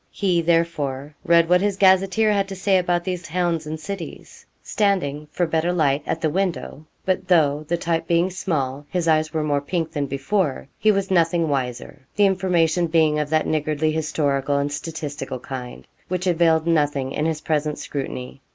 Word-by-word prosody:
He, 180 -4 0
therefore, 155 -4 0
read 170 -1 +4
what 180 +1 +4
his 200 -1 0
gazetteer 195 +3 +4
had 200 -1 +1
to 195 - -6
say 190 0 +2
about 175 -1 0
these 180 -1 -3
towns 170 -2 -1
and 155 +1 -5
cities, 195 +1 -8 0.2
standing, 165 -8 0
for 175 +3 0
better 160 +1 0
light, 150 -5 +1
at 165 - -2
the 155 - +1
window. 175 -4 -3 0.2
But 185 0 -1
though, 155 -4 +3
the 170 - 0
type 165 -1 -1
being 170 +2 +2
small, 145 -6 -3
his 180 -2 -1
eyes 155 -1 +2
were 155 -1 -1
more 145 -2 0
pink 165 +2 -2
than 145 -2 -2
before, 140 +2 -1
he 215 - +4
was 195 -1 -1
nothing 170 -2 +2
wiser, 130 +1 -3
the 205 - +4
information 175 -3 +2
being 155 -2 +2
of 150 -1 -2
that 155 0 +2
niggardly 155 0 0
historical 145 -3 0
and 140 +1 -1
statistical 145 -3 -5
kind 125 -1 -8 0.2
which 180 0 -2
availed 165 -2 +3
nothing 145 -5 +1
in 150 +3 -1
his 160 -1 -2
present 150 -1 -1
scrutiny. 135 -1 -6
160 Hz, 180 wpm, -22 LUFS, 145-180 Hz, 0.2 s, read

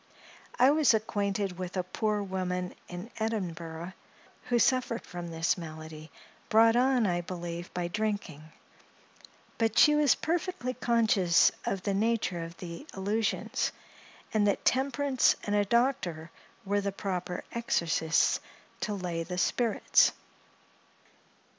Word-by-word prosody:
I 255 +3 +6
was 295 -6 +4
acquainted 200 -3 -2
with 185 +1 -5
a 185 - +1
poor 210 +3 -1
woman, 180 -1 -3
in 180 +6 -8
Edinburgh, 175 -6 -4 0.5
who 245 - +1
suffered 240 0 +1
from 175 -1 -7
this 165 +2 0
malady, 155 -1 -9 0.4
brought 225 +1 +5
on, 250 -1 +3
I 175 -2 0
believe, 175 0 -6
by 175 -1 -1
drinking; 185 -6 -3 1.1
but 225 -1 +1
she 300 - +7
was 300 -3 +4
perfectly 330 -5 -2
conscious 215 -9 +3 0.2
of 195 -2 -2
the 200 - 0
nature 205 -4 0
of 165 0 -9
the 175 - -8
illusions; 205 +3 -1 0.6
and 210 -2 +3
that 200 - 0
temperance 270 0 +2
and 205 - -1
a 205 0 +3
doctor 190 -9 0 0.3
were 205 +1 +1
the 200 0 -2
proper 185 -2 -4
exorcists 165 -8 +1 0.4
to 210 - -2
lay 175 -3 -3
the 180 +2 -5
spirits. 230 +5 +3
200 Hz, 125 wpm, -29 LUFS, 175-230 Hz, 1.1 s, she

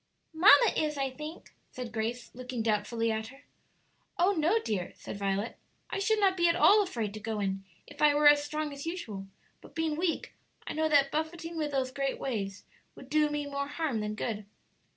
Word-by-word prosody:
"Mamma 405 +7 +7
is, 300 -1 0
I 270 -1 -1
think," 300 +5 -9 0.2
said 250 -2 -7
Grace, 235 +2 -3
looking 250 -2 -4
doubtfully 225 +1 0
at 220 0 -2
her. 270 +4 -15 0.7
"Oh 360 +3 +4
no, 345 +3 +2
dear," 210 - -2
said - - -8
Violet; 200 +3 -2 0.3
"I - - -1
should 435 +2 +2
not 390 -2 +4
be 345 -2 +3
at 335 - +3
all 405 +3 +6
afraid 230 - -3
to 215 - -6
go 215 0 -3
in 195 -1 -2 0.2
if 290 - -12
I 295 -1 +6
were 295 0 +5
as 290 0 +7
strong 305 0 -3
as 280 +3 -7
usual; 220 - -5 0.3
but - - -16
being 320 -2 0
weak, 335 +1 -1 0.3
I - - -4
know 315 0 +1
that 280 -2 +4
buffeting 330 +2 -3
with 305 -2 -1
those 265 -2 -1
great 275 0 -2
waves 200 -7 -4 0.3
would 265 - -13
do 305 0 +3
me 295 0 -2
more 280 0 -3
harm 290 -5 -2
than 210 0 -3
good." 215 -2 -4
280 Hz, 200 wpm, -30 LUFS, 225-315 Hz, 0.7 s, Mamma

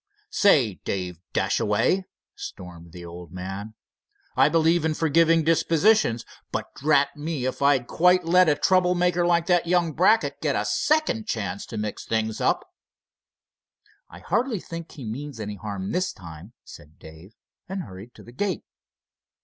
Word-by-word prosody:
Say, 135 - +3
Dave 90 -3 -4
Dashaway!" 115 - +1 0.3
stormed 85 -3 -10
the 85 +1 -10
old 85 0 -10
man, 95 +4 -7 0.6
"I - - +5
believe 165 +1 +3
in 160 -1 0
forgiving 165 +1 +3
dispositions, 165 - +3 0.3
but - - -4
drat 140 -1 +2
me 150 -3 -4
if 130 - -3
I'd 140 -3 +3
quite 180 +5 +3
let 180 0 +5
a 150 - +3
trouble 180 +2 +3
maker 175 0 +2
like 170 -1 +2
that 175 -2 +2
young 175 -2 +2
Brackett 205 +8 +2
get - - 0
a - - 0
second 305 -8 +1
chance 200 -1 -3
to 115 - -7
mix 105 -1 -4
things 110 -1 -1
up." - - +1 1.4
"I 90 - -12
hardly 225 - 0
think 170 -1 -8
he 140 -6 -9
means 130 +3 -6
any 105 -1 -5
harm 100 -1 -5
this 185 +2 0
time," 85 +4 -12
said 75 +2 -14
Dave, 80 +7 -14 0.3
and 190 -1 -4
hurried 95 +4 -11
to - - -14
the 120 - -13
gate. 190 +8 -2
150 Hz, 155 wpm, -25 LUFS, -, 1.4 s, I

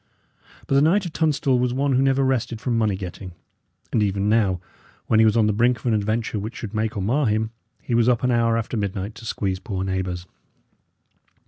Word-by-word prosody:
But - - -2
the 140 - +5
Knight 185 +6 +3
of 170 - -6
Tunstall 145 -5 +1
was 125 0 0
one 140 +1 +1
who 130 - +3
never 135 0 +3
rested 125 -3 0
from 120 0 -1
money 110 -3 +1
getting; 95 -1 -7 0.6
and 110 - +3
even 100 0 0
now, 105 -4 +2 0.5
when 110 - +3
he 110 - +6
was 110 +1 +2
on 110 - +4
the 105 - +2
brink 120 +3 +2
of - - -17
an 120 - +2
adventure 110 +1 -1
which 110 +4 -6
should 110 -2 -7
make 110 -1 -1
or 95 - -1
mar 130 +7 +1
him, 110 +1 0 0.3
he - - -3
was 115 +1 +4
up 120 -1 +1
an 125 - +2
hour 115 -1 +2
after 115 +1 -3
midnight 100 -1 -3
to 115 - -12
squeeze 95 -4 -2
poor 95 -3 -4
neighbours. 95 -2 -3
110 Hz, 220 wpm, -23 LUFS, 100-125 Hz, 0.6 s, he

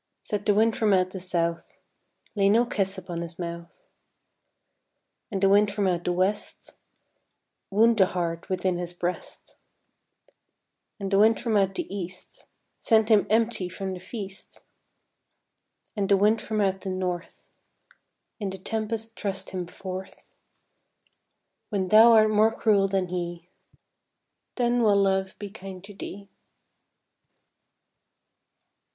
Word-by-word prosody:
Said 205 -1 -4
the 205 - +4
wind 220 +1 +3
from 215 -3 +2
out 185 -1 +2
the 190 - -6
south, 170 -2 -2 0.6
"Lay 200 -1 +3
no 230 +4 +4
kiss 195 -4 -2
upon 175 -2 -6
his 170 0 -7
mouth," 170 - -7 1.5
And 195 -3 -3
the 195 - +5
wind 205 +1 +4
from 200 0 -1
out 175 -2 -1
the 180 - +1
west, 185 +4 -2 1.0
"Wound 225 +3 +3
the 190 - +6
heart 170 -2 -3
within 185 -1 -1
his 175 0 -5
breast," 175 +1 -6 1.4
And 195 -1 -4
the 195 - +4
wind 220 +2 +5
from 230 -2 -1
out 195 -1 +2
the - - -2
east, 180 -1 -8 0.3
"Send 220 -1 +3
him 205 -3 +4
empty 220 -4 +1
from 190 +1 -5
the 180 - -7
feast," 195 0 -9 1.3
And 200 -2 -1
the 200 - +5
wind 210 +3 +3
from 215 -1 -2
out 190 -1 0
the 195 - -4
north, 185 -2 -4 0.9
"In 205 -3 -2
the 190 - -6
tempest 225 +3 -4
thrust 195 -2 -4
him 180 -2 -4
forth; 185 +1 -9 1.4
When 190 -3 -1
thou 225 +3 +8
art 215 -1 +5
more 215 +1 +4
cruel 205 -3 +2
than 190 -2 -1
he, 175 -1 -5 1.1
Then 240 -1 +1
will 210 -3 +4
Love 190 -1 0
be 205 -2 -7
kind 190 -3 -9
to 205 +1 -10
thee." 200 0 -9
195 Hz, 135 wpm, -26 LUFS, 185-215 Hz, 1.5 s, thou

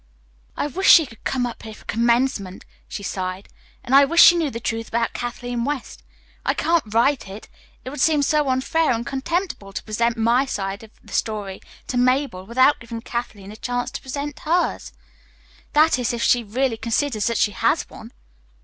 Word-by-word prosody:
"I - - 0
wish 365 +7 0
she 325 - +8
could 225 -5 -16
come 255 -2 0
up 240 - -6
here 220 -1 -9
for - - -18
commencement," 235 -4 0 0.2
she 200 - -7
sighed, 185 0 -4 0.4
"and 245 - -4
I 280 +1 +8
wish 335 +5 +1
she 340 - +8
knew 325 -4 0
the 230 - -6
truth 225 -1 -3
about 230 0 -1
Kathleen 245 0 -4
West. 280 0 -4 0.4
I - - 0
can't 330 -10 +1
write 240 +2 +2
it. 195 +3 -10 0.4
It 260 - -5
would 290 -2 -5
seem 300 -1 +3
so 300 -1 +2
unfair 260 +4 +1
and 230 0 -3
contemptible 275 - -3
to - - -5
present 230 +2 -1
my 235 +4 +2
side 195 -4 -4
of 225 - -13
the - - -13
story 205 -3 -3 0.2
to 250 - -3
Mabel 255 -7 +1
without 260 +5 +3
giving 230 -1 -7
Kathleen 220 -5 -6
a - - -10
chance 245 +2 -3
to - - -6
present 285 +2 -5
hers. 345 +3 -1 0.8
That 305 -2 +4
is, 245 -1 -1
if 235 - -2
she 245 -1 +3
really 235 +2 -1
considers 230 0 -1
that 230 -1 0
she 205 - +2
has 190 - 0
one." - - -12
240 Hz, 190 wpm, -22 LUFS, 220-280 Hz, 0.8 s, she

